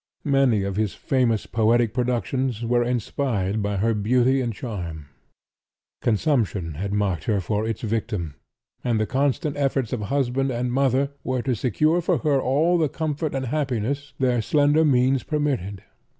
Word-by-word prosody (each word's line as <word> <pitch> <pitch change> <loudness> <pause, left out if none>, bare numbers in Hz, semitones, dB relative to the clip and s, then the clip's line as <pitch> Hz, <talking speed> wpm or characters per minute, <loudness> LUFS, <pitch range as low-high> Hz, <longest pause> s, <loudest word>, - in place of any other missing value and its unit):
Many 135 -7 +3
of 100 0 -3
his 105 -2 -1
famous 125 -5 0
poetic 115 0 +2
productions 125 -1 -1
were 120 +1 +2
inspired 115 -4 -1
by 100 0 -1
her 115 +4 +2
beauty 125 +5 +2
and 120 -2 -1
charm. 85 - -6 0.9
Consumption 110 - 0
had 100 +7 -4
marked 100 -5 -1
her 105 -3 +1
for 105 +4 -1
its 115 -2 -3
victim, 105 -8 -2 0.5
and 115 -3 +1
the 110 - +1
constant 140 +4 0
efforts 135 -4 0
of 120 - -2
husband 135 +3 0
and 120 0 -2
mother 135 +1 +2
were 130 -2 -1
to 130 - 0
secure 150 - +1
for 175 0 +1
her 145 -4 +1
all 160 +8 +2
the 155 -3 +2
comfort 155 -1 -3
and 135 -1 -2
happiness 140 +1 -2
their 125 -3 +1
slender 145 +6 +3
means 130 -2 +3
permitted. 135 - -2
125 Hz, 155 wpm, -24 LUFS, 110-140 Hz, 0.9 s, Many